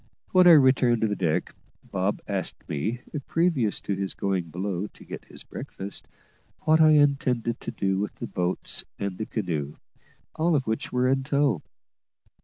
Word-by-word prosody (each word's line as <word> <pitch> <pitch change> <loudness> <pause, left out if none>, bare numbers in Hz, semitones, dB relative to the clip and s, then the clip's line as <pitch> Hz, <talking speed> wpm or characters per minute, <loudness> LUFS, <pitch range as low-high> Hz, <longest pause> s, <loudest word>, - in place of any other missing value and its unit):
When 185 -1 +6
I 175 - +10
returned 130 -5 +5
to 110 - +3
the 105 - -1
deck, 85 -5 -1 0.3
Bob 95 +1 -2
asked 95 -3 -3
me, 110 - -2 0.3
previous 160 - +1
to 100 - -2
his 95 -1 -3
going 95 -3 -1
below 95 +3 -3
to - - -17
get - - -8
his - - -7
breakfast, 100 +1 -7 0.5
what 160 +1 +4
I 155 -1 +7
intended 135 -5 +2
to - - -6
do 95 -1 -1
with, 105 - -3
the - - -5
boats 90 0 -2
and 100 -2 -4
the 110 - -3
canoe, 80 -9 -3 0.6
all 165 +1 +2
of 135 -3 +1
which 110 0 -2
were 125 0 +2
in 135 +1 +2
tow. 140 - +1
110 Hz, 170 wpm, -26 LUFS, 95-140 Hz, 0.6 s, I